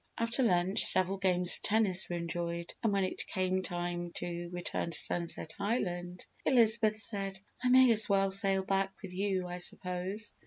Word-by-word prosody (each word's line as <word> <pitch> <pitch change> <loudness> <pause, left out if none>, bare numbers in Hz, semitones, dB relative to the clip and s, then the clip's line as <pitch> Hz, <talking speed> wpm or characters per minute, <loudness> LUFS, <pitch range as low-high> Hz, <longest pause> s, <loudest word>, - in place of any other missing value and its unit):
After 230 +3 0
lunch, 185 -4 +2
several 185 +1 +6
games 180 -2 +2
of - - -11
tennis 205 -4 +2
were 175 - -3
enjoyed 170 0 -5
and 225 -3 0
when 200 -1 0
it 185 - -4
came 185 0 -2
time 175 -1 -4
to 175 0 -6
return 175 -1 -4
to 170 - -3
Sunset 170 -2 -2
Island 180 -5 -4 0.2
Elizabeth 225 -4 +3
said, 200 -3 -2 0.2
"I 250 - +1
may 255 -1 +6
as 220 -1 +7
well 195 -1 +1
sail 195 -1 +2
back 195 0 -1
with 185 -2 -9
you, 190 -1 -2
I 175 0 -6
suppose." 180 +3 -3
190 Hz, 170 wpm, -31 LUFS, 175-205 Hz, 0.2 s, as